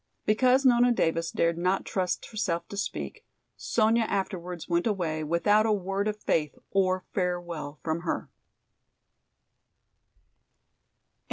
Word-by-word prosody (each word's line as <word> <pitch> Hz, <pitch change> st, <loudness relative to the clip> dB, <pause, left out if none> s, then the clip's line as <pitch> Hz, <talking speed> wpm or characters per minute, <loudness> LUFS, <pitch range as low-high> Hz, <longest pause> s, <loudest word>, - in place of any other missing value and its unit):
Because 255 Hz, +5 st, +3 dB
Nona 245 Hz, -1 st, +5 dB
Davis 165 Hz, -6 st, +1 dB
dared 170 Hz, 0 st, 0 dB
not 185 Hz, +2 st, +1 dB
trust 185 Hz, -2 st, -2 dB
herself 170 Hz, -6 st, -2 dB
to -, -, -7 dB
speak, 200 Hz, -, -4 dB, 0.3 s
Sonya 225 Hz, 0 st, +2 dB
afterwards 180 Hz, -4 st, -3 dB
went 175 Hz, +3 st, +1 dB
away 165 Hz, -7 st, -1 dB
without 205 Hz, +8 st, +3 dB
a -, -, +2 dB
word 195 Hz, 0 st, -1 dB
of 210 Hz, 0 st, -2 dB
faith 150 Hz, -6 st, 0 dB
or 185 Hz, -1 st, +1 dB
farewell 175 Hz, -5 st, -3 dB
from 160 Hz, 0 st, -1 dB
her. 170 Hz, -, -3 dB
185 Hz, 115 wpm, -28 LUFS, 170-215 Hz, 0.3 s, Nona